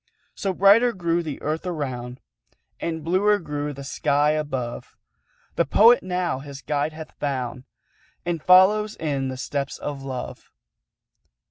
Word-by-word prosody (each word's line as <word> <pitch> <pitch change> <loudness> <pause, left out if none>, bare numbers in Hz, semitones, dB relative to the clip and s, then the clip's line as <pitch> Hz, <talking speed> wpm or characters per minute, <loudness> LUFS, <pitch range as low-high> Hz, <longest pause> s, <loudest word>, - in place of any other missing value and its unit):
So 195 - -2
brighter 205 +6 +5
grew 170 -2 0
the 155 -4 -6
Earth 155 +2 -2
around, 130 -7 -4 0.6
And 160 -2 -3
bluer 195 +5 +3
grew 150 -4 -4
the 140 0 -8
sky 145 +2 +1
above; 135 -6 -4 0.6
The - - +4
Poet 230 - +6
now 180 -6 -2
his 140 0 -10
guide 145 +1 -1
hath 160 0 -9
found, 130 -3 -3 0.6
And 170 -2 -2
follows 200 +5 +5
in 140 -4 -2
the 130 0 -5
steps 140 +1 -3
of 145 -2 -5
Love. 130 -2 -7
150 Hz, 135 wpm, -24 LUFS, 140-180 Hz, 0.6 s, Poet